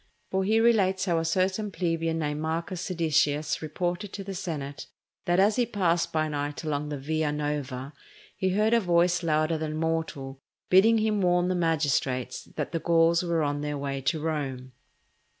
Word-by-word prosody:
For 190 Hz, 0 st, +1 dB
he 215 Hz, +3 st, +3 dB
relates 200 Hz, -5 st, +3 dB
how 170 Hz, -3 st, +1 dB
a -, -, -1 dB
certain 190 Hz, +5 st, 0 dB
plebeian 165 Hz, -3 st, -1 dB
named 150 Hz, -1 st, -2 dB
Marcus 165 Hz, +3 st, -3 dB
Ceditius 155 Hz, -4 st, 0 dB
reported 175 Hz, +5 st, -3 dB
to 195 Hz, -, -5 dB
the 195 Hz, 0 st, -6 dB
senate 150 Hz, -6 st, -5 dB, 0.4 s
that 175 Hz, +1 st, +2 dB
as 205 Hz, +3 st, +4 dB
he 245 Hz, -, +3 dB
passed 175 Hz, -6 st, +1 dB
by 155 Hz, -1 st, +1 dB
night 145 Hz, +1 st, -3 dB
along 150 Hz, -1 st, -2 dB
the 145 Hz, -, -3 dB
Via 155 Hz, +2 st, -1 dB
Nova, 145 Hz, -2 st, -3 dB, 0.4 s
he 190 Hz, -, 0 dB
heard 210 Hz, +4 st, +2 dB
a 235 Hz, -, +5 dB
voice 175 Hz, -2 st, +2 dB
louder 155 Hz, -1 st, +1 dB
than 155 Hz, -1 st, -3 dB
mortal, 155 Hz, -5 st, -3 dB, 0.3 s
bidding 215 Hz, +5 st, +6 dB
him 215 Hz, -2 st, +1 dB
warn 180 Hz, 0 st, +2 dB
the -, -, +1 dB
magistrates 145 Hz, -7 st, 0 dB
that -, -, -3 dB
the 165 Hz, -, -1 dB
Gauls 165 Hz, 0 st, +3 dB
were 170 Hz, -3 st, 0 dB
on 145 Hz, 0 st, -1 dB
their 150 Hz, 0 st, -3 dB
way 140 Hz, -1 st, -3 dB
to 155 Hz, +4 st, 0 dB
Rome. 140 Hz, -5 st, -3 dB
165 Hz, 175 wpm, -27 LUFS, 150-185 Hz, 0.4 s, bidding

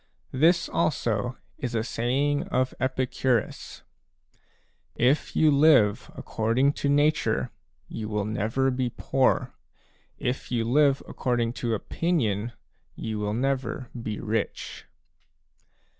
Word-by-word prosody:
— -, -, -39 dB
This 170 Hz, 0 st, +4 dB
also 120 Hz, -6 st, 0 dB, 0.2 s
is 125 Hz, -2 st, -3 dB
a 110 Hz, -, +1 dB
saying 135 Hz, +5 st, 0 dB
of 130 Hz, 0 st, 0 dB
Epicurus": 130 Hz, -2 st, -1 dB, 1.1 s
"If 130 Hz, +5 st, +1 dB
you 155 Hz, -1 st, +5 dB
live 140 Hz, -8 st, +4 dB
according 120 Hz, +6 st, +1 dB
to 140 Hz, -, +1 dB
nature, 145 Hz, +2 st, +2 dB, 0.4 s
you 110 Hz, -1 st, -5 dB
will 105 Hz, -2 st, -1 dB
never 110 Hz, +5 st, 0 dB
be 125 Hz, -1 st, -1 dB
poor; 130 Hz, -1 st, +1 dB, 0.6 s
if 125 Hz, +1 st, -3 dB
you 120 Hz, -2 st, +1 dB
live 140 Hz, +3 st, +3 dB
according 120 Hz, -2 st, -1 dB
to 115 Hz, -2 st, 0 dB
opinion, 120 Hz, -, -1 dB, 0.4 s
you 110 Hz, -1 st, -4 dB
will 105 Hz, 0 st, -1 dB
never 130 Hz, -1 st, -2 dB
be 110 Hz, -3 st, -4 dB
rich." 110 Hz, -1 st, -3 dB
125 Hz, 115 wpm, -26 LUFS, 115-140 Hz, 1.1 s, you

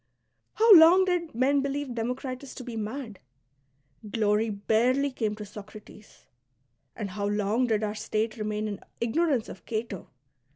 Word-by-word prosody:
How 450 Hz, 0 st, +7 dB
long 350 Hz, +2 st, +8 dB
did 350 Hz, -6 st, -1 dB
men 275 Hz, +3 st, +2 dB
believe 280 Hz, -1 st, -3 dB
Democritus 250 Hz, +3 st, -4 dB
^' -, -, -16 dB
to 260 Hz, -, -6 dB
be 240 Hz, -2 st, -7 dB
mad 220 Hz, -1 st, -5 dB, 0.8 s
I -, -, -10 dB
Glory 210 Hz, +1 st, +1 dB
barely 240 Hz, +7 st, +1 dB
came 220 Hz, -4 st, -2 dB
to 210 Hz, -, -7 dB
Soci*ates. 210 Hz, +1 st, -13 dB, 0.7 s
And 200 Hz, -3 st, -5 dB
how 200 Hz, +1 st, -3 dB
long 210 Hz, +4 st, 0 dB
did 220 Hz, -2 st, 0 dB
our 210 Hz, -1 st, -1 dB
state 215 Hz, +1 st, -2 dB
remain 215 Hz, -1 st, -3 dB
in 205 Hz, -2 st, -5 dB, 0.2 s
ignorance 260 Hz, +1 st, +1 dB
of -, -, -10 dB
Cato 220 Hz, -4 st, -4 dB
225 Hz, 155 wpm, -27 LUFS, 210-270 Hz, 0.8 s, long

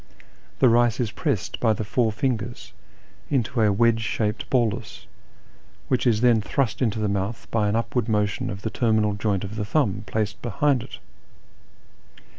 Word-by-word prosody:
The 130 Hz, -, +5 dB
rice 120 Hz, 0 st, +3 dB
is 115 Hz, -4 st, -1 dB
pressed -, -, -2 dB
by 110 Hz, -2 st, +3 dB
the 110 Hz, -, -3 dB
four 115 Hz, +1 st, +1 dB
fingers 120 Hz, 0 st, -3 dB, 0.6 s
into 125 Hz, -3 st, 0 dB
a 105 Hz, -1 st, +4 dB
wedge 115 Hz, +2 st, +3 dB
shaped 110 Hz, -1 st, -2 dB
bolus, 120 Hz, -5 st, -1 dB, 0.8 s
which 130 Hz, -1 st, +1 dB
is 110 Hz, -2 st, +2 dB
then 120 Hz, -3 st, +4 dB
thrust 125 Hz, +2 st, -1 dB
into 115 Hz, -3 st, +1 dB
the 105 Hz, -1 st, 0 dB
mouth 100 Hz, +3 st, -3 dB
by 105 Hz, -2 st, +1 dB
an 105 Hz, -, 0 dB
upward 115 Hz, 0 st, -1 dB
motion 105 Hz, -1 st, 0 dB
of 100 Hz, 0 st, -6 dB
the 110 Hz, -, -2 dB
terminal 110 Hz, -3 st, +2 dB
joint 100 Hz, -2 st, -1 dB
of 100 Hz, +2 st, -6 dB
the 105 Hz, -, -1 dB
thumb, 105 Hz, -3 st, 0 dB
placed 105 Hz, 0 st, -2 dB
behind 125 Hz, +3 st, +1 dB
it. -, -, -9 dB
110 Hz, 165 wpm, -24 LUFS, 105-120 Hz, 0.8 s, The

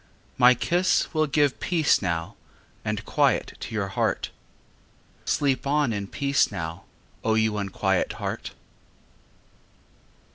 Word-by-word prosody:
My 125 Hz, 0 st, +6 dB
kiss 175 Hz, +10 st, +1 dB
will 155 Hz, -1 st, +2 dB
give 145 Hz, -1 st, +2 dB
peace 165 Hz, -4 st, +2 dB
now 85 Hz, -4 st, -2 dB, 0.5 s
And -, -, -3 dB
quiet -, -, +1 dB
to -, -, -6 dB
your 100 Hz, -2 st, -1 dB
heart— 95 Hz, -, -1 dB, 0.9 s
Sleep 140 Hz, -2 st, +1 dB
on 145 Hz, -4 st, +2 dB
in 100 Hz, -1 st, -3 dB
peace 140 Hz, +3 st, +1 dB
now, 85 Hz, -4 st, -5 dB, 0.4 s
O 110 Hz, -1 st, +2 dB
you 110 Hz, -1 st, +2 dB
unquiet 100 Hz, -2 st, 0 dB
heart! -, -, -5 dB
125 Hz, 115 wpm, -25 LUFS, 100-145 Hz, 0.9 s, My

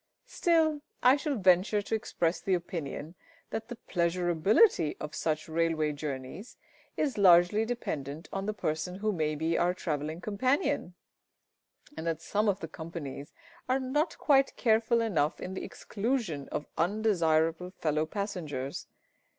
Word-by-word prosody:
Still, 320 Hz, -3 st, +2 dB, 0.2 s
I 255 Hz, +2 st, +7 dB
shall 290 Hz, 0 st, -2 dB
venture 190 Hz, +1 st, +3 dB
to -, -, -5 dB
express 170 Hz, -6 st, 0 dB
the 190 Hz, -, +2 dB
opinion 165 Hz, -2 st, -5 dB, 0.4 s
that 220 Hz, 0 st, -4 dB
the 240 Hz, -, -6 dB
pleasurability 175 Hz, -, +3 dB
of 150 Hz, 0 st, -6 dB
such 155 Hz, 0 st, -1 dB
railway 160 Hz, -1 st, +1 dB
journeys 145 Hz, -, -6 dB, 0.4 s
is 280 Hz, -8 st, 0 dB
largely 180 Hz, +3 st, +6 dB
dependent 155 Hz, -, -4 dB
upon 195 Hz, +1 st, -4 dB
the 215 Hz, -, 0 dB
person 160 Hz, +1 st, -2 dB
who 215 Hz, +3 st, 0 dB
may 155 Hz, -5 st, -1 dB
be 160 Hz, +2 st, 0 dB
our 180 Hz, +1 st, +2 dB
travelling 155 Hz, -2 st, -3 dB
companion, 255 Hz, -, 0 dB, 1.0 s
and 165 Hz, -, -5 dB
that 165 Hz, -1 st, -1 dB
some 210 Hz, +5 st, 0 dB
of 195 Hz, 0 st, -1 dB
the 165 Hz, -, -4 dB
companies 160 Hz, -3 st, -7 dB, 0.4 s
are 260 Hz, +1 st, +3 dB
not 295 Hz, +5 st, -1 dB
quite 275 Hz, -2 st, +3 dB
careful 230 Hz, 0 st, +3 dB
enough 165 Hz, -9 st, 0 dB
in 185 Hz, -, -5 dB
the 190 Hz, -, -5 dB
exclusion 210 Hz, -, -3 dB
of 150 Hz, -, -3 dB
undesirable 170 Hz, -3 st, +2 dB
fellow 155 Hz, -4 st, -1 dB
passengers. 160 Hz, -9 st, -4 dB
180 Hz, 140 wpm, -30 LUFS, 160-220 Hz, 1.0 s, I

